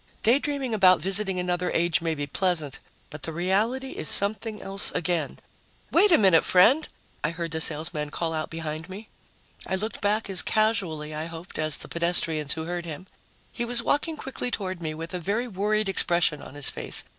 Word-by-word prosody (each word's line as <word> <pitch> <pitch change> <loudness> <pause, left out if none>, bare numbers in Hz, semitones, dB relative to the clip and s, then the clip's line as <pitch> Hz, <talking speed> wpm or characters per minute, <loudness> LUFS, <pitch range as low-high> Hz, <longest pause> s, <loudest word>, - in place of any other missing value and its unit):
Daydreaming 270 +1 +1
about 185 -4 +5
visiting 195 0 0
another 180 0 -1
age 170 0 +1
may 165 -1 -1
be 145 -1 -3
pleasant, 155 -2 -1 0.3
but 150 - -8
the 165 - -3
reality 210 +10 0
is 155 - -4
something 210 +1 +2
else 195 +1 -1
again. 170 -3 -2 0.5
"Wait 415 -1 +5
a 330 - +7
minute, 190 -6 +5
friend!" 260 +12 +4 0.4
I 150 - +1
heard 165 0 -5
the 160 0 -3
salesman 155 -1 0
call 165 +2 -3
out 155 -1 -3
behind 160 +1 -6
me. 205 +4 -9 0.6
I 190 - -1
looked 215 +4 -5
back 210 +1 0
as 190 -2 +7
casually, 190 -9 0
I 155 +2 -4
hoped, 165 +1 -9
as 155 -1 +3
the - - -2
pedestrians 165 -3 -1
who 160 - -4
heard 175 +1 -4
him. 165 +3 -7 0.5
He 240 - -4
was 235 0 +3
walking 310 +4 0
quickly 265 -2 -5
toward 185 -6 -4
me 155 -1 -4
with 165 +3 -8
a 180 - -2
very 210 +8 -2
worried 215 0 -1
expression 170 -5 +3
on - - -11
his 145 -1 +2
face. - - +2
180 Hz, 190 wpm, -25 LUFS, 160-215 Hz, 0.6 s, a